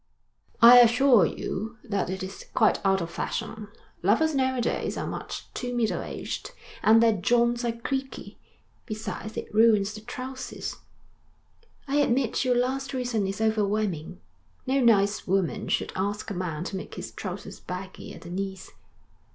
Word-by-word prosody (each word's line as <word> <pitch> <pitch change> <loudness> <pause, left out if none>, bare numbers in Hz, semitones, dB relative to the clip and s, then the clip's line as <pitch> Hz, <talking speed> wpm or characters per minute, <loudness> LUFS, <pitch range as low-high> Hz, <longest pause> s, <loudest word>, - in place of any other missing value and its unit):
'I 245 +1 +11
assure 240 - +6
you 220 +4 -5
that 200 -4 -2
it 190 +1 -4
is 190 +1 -8
quite - - +3
out 195 -1 +3
of 170 0 -4
fashion. 215 -2 -4 0.3
Lovers 235 - +3
now 260 -1 +1
a - - -1
days 235 - -1
are - - -2
much - - -5
too 245 -1 -4
middle 230 -3 0
aged, - - -6 0.3
and 225 +1 +6
their 225 -1 +5
joints 235 +5 +2
are 235 - +1
creaky. 265 +3 -5 0.5
Besides 215 -1 -5
it - - -6
ruins 215 -2 +4
the 215 - -9
trousers.' 255 +3 -6 1.1
'I 280 +1 +1
admit 265 -4 +2
your 250 -1 +2
last 260 +2 -1
reason 240 -6 -1
is 195 +2 -4
overwhelming. 210 -6 0 0.5
No 270 +1 +1
nice 210 -4 +3
woman 190 -2 0
should - - -1
ask 205 +3 -2
a - - -2
man 175 -4 -3
to 190 - -4
make - - -8
his - - -6
trousers - - -7
baggy 185 +1 -7
at - - -12
the 170 - -9
knees.' 190 0 -5
220 Hz, 160 wpm, -27 LUFS, 195-245 Hz, 1.1 s, I